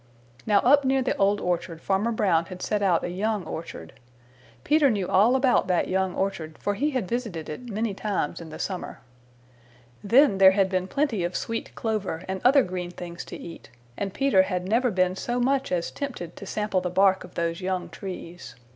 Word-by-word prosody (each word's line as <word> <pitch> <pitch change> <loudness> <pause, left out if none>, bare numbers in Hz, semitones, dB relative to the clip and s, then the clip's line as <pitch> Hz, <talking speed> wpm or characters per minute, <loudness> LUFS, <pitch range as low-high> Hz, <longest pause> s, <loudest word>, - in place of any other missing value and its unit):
Now 205 -2 +4
up 285 +3 +5
near 265 0 +2
the 250 - 0
Old 200 +1 +2
Orchard 170 -2 -2
Farmer 200 +6 0
Brown 185 -7 +2
had 185 +1 -8
set 210 -1 -1
out 185 -4 +2
a - - -2
young 210 +2 -1
orchard. 155 - -7 0.7
Peter 300 -2 +4
knew 200 -6 -1
all 205 +6 +4
about 260 -1 +3
that 180 -2 +1
young 190 -1 0
orchard, 165 -5 -3
for 205 - -1
he 285 +9 0
had 255 -9 -2
visited 225 -10 -3
it 240 +11 -7
many 215 0 -2
times 195 -6 -2
in 165 - -9
the 155 - -8
summer. 185 -7 -5 1.0
Then 235 0 +4
there 190 -1 +8
had 195 -1 +3
been 185 -1 -1
plenty 255 - 0
of 175 +1 -3
sweet 230 0 -4
clover 210 -7 -2
and 190 0 -4
other 270 +2 +6
green 180 -1 -4
things 175 -1 -8
to - - -8
eat, 165 - -10 0.3
and 195 +6 -3
Peter 270 -4 +3
had 185 -1 -2
never 240 +5 +2
been 185 -2 +1
so 240 +5 -2
much 270 0 +1
as 175 -2 -1
tempted 245 - -6
to 200 - -9
sample 210 -3 -1
the 180 - -2
bark 190 +1 +3
of - - -14
those 170 +1 -2
young 185 -1 -2
trees. 175 -3 -8
195 Hz, 200 wpm, -25 LUFS, 180-230 Hz, 1.0 s, there